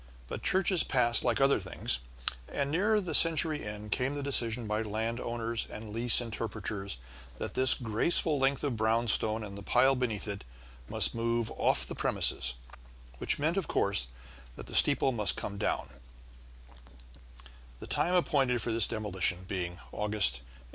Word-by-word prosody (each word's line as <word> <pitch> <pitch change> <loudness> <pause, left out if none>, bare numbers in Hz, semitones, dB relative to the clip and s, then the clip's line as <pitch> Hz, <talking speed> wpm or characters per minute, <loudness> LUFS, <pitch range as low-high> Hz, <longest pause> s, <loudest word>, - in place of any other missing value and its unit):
But - - -6
churches 185 -2 +3
pass 120 -3 +3
like 120 -2 +1
other 135 -2 +4
things, 90 -9 -2 0.5
and 140 0 -2
near 210 +6 +2
the 180 -5 -4
century 160 -1 +3
end 105 0 -7
came 130 +7 0
the 145 - -4
decision 120 -4 -1
by 105 +1 -1
landowners 115 +1 -3
and 110 -1 -8
lease 115 +1 +5
interpreters 110 - -4 0.4
that - - -5
this 130 0 +4
graceful 135 +6 +2
length 135 +1 +1
of 140 -5 -1
brownstone 110 0 +1
and 100 -2 -8
the 100 - -8
pile 125 +6 +3
beneath 120 -5 -2
it 100 -1 -3 0.5
must - - +3
move 115 0 -1
off - - +1
the - - -6
premises, 60 0 0 0.6
which - - 0
meant, 155 +5 0
of 190 - -1
course, 100 -12 0 0.5
that - - -9
the - - -10
steeple 135 - +3
must 105 -5 +1
come 100 -1 -5
down, - - -1 1.9
the - - -8
time 180 +2 0
appointed 135 -8 +2
for 115 - -2
this 115 -2 +1
demolition 95 -4 -2
being 90 -3 -3 0.2
August, 105 -12 +3
1899. - - -17
115 Hz, 155 wpm, -30 LUFS, 105-135 Hz, 1.9 s, lease